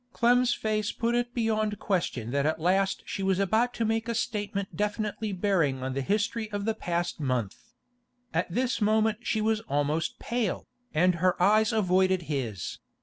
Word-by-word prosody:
Clem's 245 +1 +4
face 215 -2 -1
put 235 +1 -1
it 240 0 0
beyond 215 -3 0
question 170 - -1
that 140 +2 +1
at 160 - 0
last 190 +4 +1
she - - -4
was 190 -1 +2
about 220 +5 +2
to 230 - 0
make 225 +1 0
a 235 - -1
statement 205 -4 -2
definitely 210 0 -2
bearing 175 -9 +1
on 130 0 -2
the 135 - -1
history 215 - -1
of 205 -1 -3
the 225 - +1
past 175 -3 -2
month. 125 -8 -1 0.8
At 175 +2 0
this 250 +4 0
moment 215 0 +2
she 220 -2 -1
was 220 0 +2
almost 145 +3 0
pale, 235 -5 -2 0.2
and 180 +3 +3
her 185 0 +2
eyes 215 +4 +4
avoided 185 -3 +2
his. 125 - -4
200 Hz, 170 wpm, -28 LUFS, 170-220 Hz, 0.8 s, Clem's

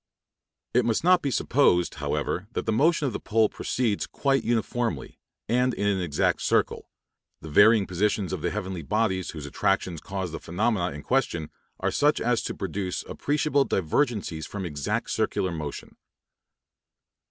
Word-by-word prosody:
It 125 - +4
must 115 +3 0
not 180 0 +5
be 140 - -1
supposed, 120 -10 +2
however, 90 +4 -2
that - - -2
the 110 - +1
motion 155 +7 +3
of 130 - -1
the - - -3
pole 110 -1 +2
proceeds 115 -5 -1
quite 135 -3 0
uniformly, 115 - -2 0.3
and 125 +1 +2
in 100 - -2
an 100 -2 +1
exact 80 -5 0
circle; - - 0 0.5
the 80 - -8
varying 100 +5 +6
positions 95 0 0
of - - -3
the - - 0
heavenly 95 -4 -4
bodies 95 +1 0
whose 75 -3 -7
attractions 80 +3 0
cause 95 -3 -4
the 80 - -5
phenomena 90 +1 0
in 75 - -8
question 85 - 0 0.3
are - - 0
such 150 +1 +2
as 120 -1 +1
to - - -4
produce 95 0 -3
appreciable 145 -1 +1
divergencies 95 - -1
from 100 -2 -5
exact 75 -4 -2
circular 95 - 0
motion. 75 -4 -6
100 Hz, 155 wpm, -26 LUFS, 90-120 Hz, 0.5 s, varying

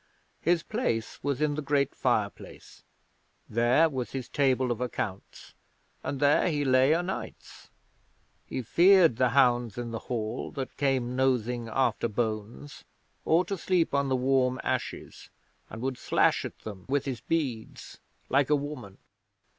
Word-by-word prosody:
His 170 -1 +2
place 115 - -2
was 140 +1 -1
in 150 -1 +1
the 150 - -3
great 140 -1 0
fireplace. 110 -5 -3 0.7
There 120 +8 +3
was 130 -5 -4
his 130 -2 -4
table 130 -3 +1
of 120 0 -3
accounts, 105 -6 -5 0.5
and 140 - -4
there 145 +5 +3
he 145 -3 -1
lay 130 +3 +4
o' 170 - +1
nights. 190 +2 -7 0.8
He 130 - -4
feared 175 - +5
the 125 -1 +3
hounds 120 -4 +2
in 120 -1 -4
the 115 - -4
Hall 110 -3 -3
that 135 -3 -5
came 130 -3 0
nosing 125 -2 0
after 120 -1 +1
bones 110 +4 -4 0.4
or 170 +3 +3
to 195 - -3
sleep 180 -3 0
on 140 -1 +1
the 130 - +2
warm 130 0 +1
ashes, - - -4 0.4
and 110 +2 -8
would 130 -1 -3
slash - - +2
at - - -7
them 100 -4 -9
with 140 0 0
his 130 -4 -4
beads 135 -6 -4 0.3
like 140 +1 +2
a 150 - +5
woman. 140 -9 -6
130 Hz, 150 wpm, -28 LUFS, 120-145 Hz, 0.8 s, feared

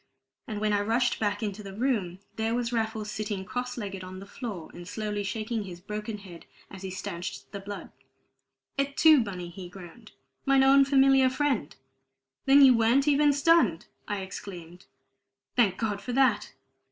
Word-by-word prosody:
And 210 -1 -4
when 210 0 +1
I 205 - +2
rushed 230 +4 +1
back 205 0 -1
into 210 0 -3
the 195 -1 -9
room, 215 -7 -1 0.2
there 225 +1 -1
was 245 0 -2
Raffles 220 -2 -2
sitting 205 -3 -4
cross 250 +3 -4
legged 195 -4 -5
on 185 0 -8
the 195 - -9
floor, 200 -5 -7
and 175 0 -10
slowly 210 0 -3
shaking 220 +2 -3
his 175 -2 -9
broken 210 +3 -5
head 185 -4 -12 0.2
as 190 - -10
he 190 - -5
stanched 185 -1 -6
the 200 - -6
blood. 200 +1 -8 0.9
"Et 275 0 -1
tu, 310 -4 +7
Bunny!" 180 -4 -6
he 180 0 -9
groaned. 190 +4 -13 0.3
"Mine 270 -1 +4
own 275 +1 +6
familiar 270 -1 +5
friend!" 265 - -1 0.7
"Then 275 +1 +8
you 255 -2 +7
weren't 235 +5 +3
even 295 0 +5
stunned!" 280 - +3 0.2
I 205 -1 -2
exclaimed. 180 -2 -9 0.7
"Thank 205 -7 +3
God 210 -3 -2
for 250 - -5
that!" 240 -6 +2
215 Hz, 170 wpm, -28 LUFS, 195-250 Hz, 0.9 s, Then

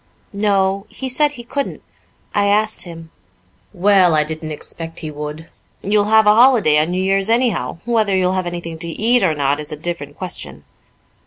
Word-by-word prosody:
"No. 200 -1 0
He 265 - -5
said 290 +3 +2
he 240 -4 -9
couldn't 280 +4 -4 0.5
I 200 -1 +2
asked 215 +1 +1
him." 165 -2 -11 0.6
"Well, 185 -3 +3
I 150 - +3
didn't 155 +1 -6
expect 165 +2 -8
he 155 -2 -5
would. 150 +2 -7 0.4
You'll 205 +1 +2
have 220 0 +4
a 210 - +6
holiday 225 - +5
on 155 +2 0
New 185 +1 -1
Year's 195 +2 +1
anyhow; 230 -7 +1
whether 220 -4 +1
you'll 185 0 +1
have 185 -1 -2
anything 170 -2 -6
to 170 - -2
eat 230 +8 +2
or 165 -5 +1
not 140 0 0
is 150 - -7
a 150 - -5
different 150 -3 -5
question." 185 -2 -5
190 Hz, 180 wpm, -18 LUFS, 160-215 Hz, 0.6 s, a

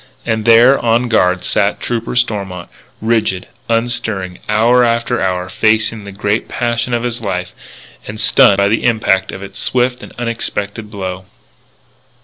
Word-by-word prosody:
And 110 -2 -1
there, 120 +4 +6
on 120 +1 +1
guard, 90 -5 +2
sat 100 +1 +1
Trooper 120 0 -3
Stormont, 100 -7 -2 0.3
rigid, 110 -5 0 0.2
unstirring, 115 -6 -1
hour 115 +4 +4
after 115 +1 0
hour, 90 -1 -1
facing 110 +2 +1
the 100 - -8
first 100 - -16
great 105 +2 0
passion 120 0 -1
of 120 - -2
his 120 -1 -3
life, 90 -4 -3 0.5
and 110 0 -7
stunned 105 -2 +5
by 100 0 +3
the 110 +2 0
impact 110 -5 +1
of 95 - -8
its 100 - -9
swift 125 0 0
and - - -11
unexpected 110 -3 -3
blow. 95 -3 -6
110 Hz, 150 wpm, -16 LUFS, 100-120 Hz, 0.5 s, there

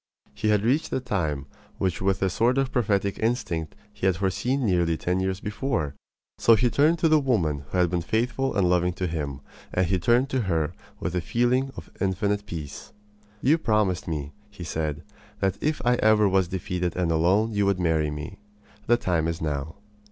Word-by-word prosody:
He 105 +1 -2
had 105 -1 +3
reached 135 +8 +1
the - - -1
time 80 - -2 0.3
which 95 -2 -1
with 95 0 +1
a 95 - +2
sort 120 +7 +2
of 135 -1 +1
prophetic 100 -4 0
instinct 100 - -1 0.2
he 95 - -1
had 95 - +3
foreseen 120 +9 0
nearly 85 -4 +2
ten 90 +3 -1
years 95 0 -1
before. 105 - -2 0.5
So 115 - +6
he 120 +2 +2
turned 155 +6 +3
to 165 - +2
the 155 -1 +5
woman 85 - 0
who 90 - -2
had 90 -1 +3
been 90 -1 0
faithful 120 +8 -1
and 100 -3 +3
loving 90 0 +2
to 90 +1 -3
him; 75 -5 -3 0.3
and 90 - +1
he 95 +1 +1
turned 120 +7 +3
to 130 - +1
her 80 -7 0 0.3
with 80 - -3
a 90 - +1
feeling 125 +7 +1
of - - -9
infinite 100 +2 0
peace. 75 -6 -7 0.5
"You 155 +6 +4
promised 105 - +1
me," 75 -3 -4 0.2
he 100 -4 -10
said, 80 -3 -3 0.4
"that 95 -1 0
if 155 0 0
ever 110 -3 +4
I - - +4
was 95 -2 +3
defeated 90 -1 -3
and 90 -2 0
alone 95 +8 +2
you 100 -1 +1
would 100 -2 +1
marry 80 -3 +1
me. 75 +7 -7 0.5
The 120 - +5
time 85 -7 0
is 85 -1 -2
now." 75 0 -3
95 Hz, 195 wpm, -25 LUFS, 85-115 Hz, 0.5 s, So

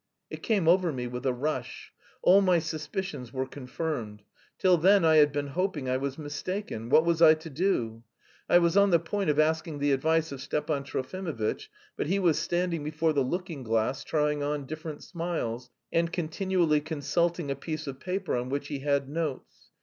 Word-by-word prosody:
It - - -7
came 200 -7 +1
over 175 0 +4
me 125 -3 -4
with 125 +2 -4
a - - +3
rush. 130 -1 -4 0.3
All 195 +2 +7
my 185 -3 +4
suspicions 155 -4 -4
were 130 0 -2
confirmed. 130 -5 -5 0.3
Till 180 -2 +4
then, 190 +1 +5
I 160 -1 +5
had 150 -1 +6
been 145 0 -2
hoping 165 -3 -2
I 130 0 +1
was 135 0 -3
mistaken! 150 - -5
What 160 +5 +5
was 170 -1 +1
I 160 -1 +8
to 160 +1 -10
do? 125 - -1 0.5
I - - +7
was 170 0 +3
on 200 0 +5
the 170 - +5
point 170 +2 -2
of 150 - +2
asking 155 0 +1
the 145 0 +1
advice 160 +3 +1
of 135 -2 -6
Stepan 145 0 -2
Trofimovitch, 140 - -3 0.3
but - - -2
he 190 +5 +1
was 175 -5 +2
standing 175 -3 -1
before 155 +1 0
the 140 - +2
looking 170 +2 -3
glass, 115 +4 0
trying 150 -1 0
on 145 -1 -2
different 155 +1 -7
smiles, 160 -9 -4 0.2
and 165 0 +2
continually 175 -2 +1
consulting 160 +1 -1
a - - -1
piece 155 +2 -5
of 135 -2 -6
paper 185 +2 -2
on 125 +1 -2
which 140 +1 -3
he 145 - -3
had 140 -1 0
notes. 150 -2 -5
155 Hz, 190 wpm, -28 LUFS, 140-170 Hz, 0.5 s, I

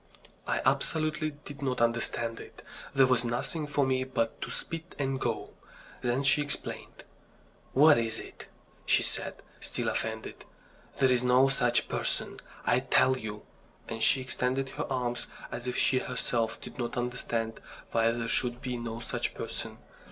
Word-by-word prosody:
I - - 0
absolutely 155 0 +1 0.2
did 145 0 -9
not 130 -2 0
understand 115 0 +1
it. - - -11 0.3
There 135 -1 +7
was 125 -2 +3
nothing 135 +6 -1
for 145 -1 +2
me 130 0 +1
but 120 -3 -1
to - - -3
spit 165 +1 -6
and 135 -2 -1
go. - - -1 0.5
Then 125 +3 +1
she 140 +2 +5
explained. 145 0 -4 0.7
"What 145 -1 +7
is 115 -1 +1
it?" - - -10 0.4
she - - +5
said, - - -2 0.2
still - - -2
offended. 110 0 -3 0.5
"There's 130 -2 +4
no 125 +2 +5
such 120 -3 +2
person, - - -1 0.3
I 125 - +4
tell 130 0 +4
you," 105 -4 -6 0.4
and 115 -1 -5
she 130 - +4
extended 130 +1 -1
her - - -4
arms 125 -2 -1 0.2
as 120 +1 -5
if 125 - -1
she 130 - +4
herself 120 -3 -1
did - - -10
not 120 0 -2
understand 120 -2 -1 0.3
why 115 0 +4
there 115 0 -1
should 120 +1 +1
be 125 -2 -3
no 115 -1 -5
such - - -2
person. - - -4
125 Hz, 155 wpm, -30 LUFS, 120-135 Hz, 0.7 s, There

